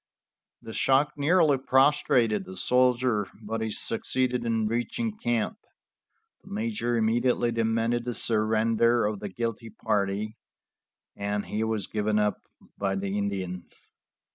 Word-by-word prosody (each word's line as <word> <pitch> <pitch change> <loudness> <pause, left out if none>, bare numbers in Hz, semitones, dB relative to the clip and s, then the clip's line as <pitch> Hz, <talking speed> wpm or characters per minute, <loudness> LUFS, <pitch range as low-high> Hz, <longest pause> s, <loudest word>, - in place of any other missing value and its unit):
The 115 - -8
shock 135 +6 +2
nearly 150 -1 +3
prostrated 130 -6 +3
the 95 0 -9
soldier, 125 -4 +2
but 110 +1 -4
he 110 - -1
succeeded 125 +2 -1
in 115 -1 +1
reaching 120 - -2
camp. 120 - -1 0.8
The - - -15
major 205 - -1
immediately 120 +2 +2
demanded 115 +1 0
the 120 -1 -3
surrender 115 +1 +2
of 105 -1 -2
the 105 - -5
guilty 115 +2 -4
party, 105 0 -2 0.8
and 100 0 -2
he 110 +1 -2
was 110 -2 -1
given 105 0 -1
up 105 -1 +1 0.4
by 95 -1 0
the 100 0 -3
Indians. 95 -3 -5
115 Hz, 125 wpm, -27 LUFS, 105-125 Hz, 0.8 s, nearly